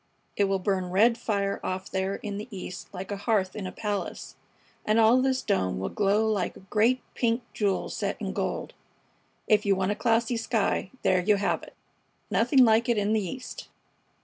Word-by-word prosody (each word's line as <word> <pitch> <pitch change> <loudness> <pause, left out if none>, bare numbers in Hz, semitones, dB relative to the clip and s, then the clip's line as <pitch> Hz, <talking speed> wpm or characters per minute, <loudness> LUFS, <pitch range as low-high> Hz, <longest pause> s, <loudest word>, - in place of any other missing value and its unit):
"It 205 - +3
will 195 0 +1
burn 185 -1 -1
red 220 +6 +4
fire 200 -4 -1
off 185 +1 -4
there 190 +1 -1
in 205 -1 -5
the 215 - -7
east 185 -3 -8
like 190 +1 -7
a 205 - -2
hearth 200 -2 0
in 200 -3 -4
a - - -5
palace, 205 -2 -4 0.5
and 215 +2 +2
all 230 +3 +5
this 260 0 +1
dome 95 - 0
will 95 - -3
glow 205 +2 +2
like 205 -5 -1
a - - -14
great 225 +6 +1
pink 235 0 0
jewel 200 -3 0
set - - -3
in - - -3
gold. - - -3 0.7
If 210 -2 +4
you 200 -1 +3
want 190 +1 0
a - - -1
classy 230 +2 +1
sky, 225 -4 0
there 185 - +3
you 210 +3 +3
have 200 0 0
it! - - -13 0.6
Nothing 265 -4 +5
like 225 +2 +3
it 235 - +3
in 205 +1 +1
the 220 - +2
East!" 250 +7 -7
205 Hz, 195 wpm, -27 LUFS, 190-225 Hz, 0.7 s, all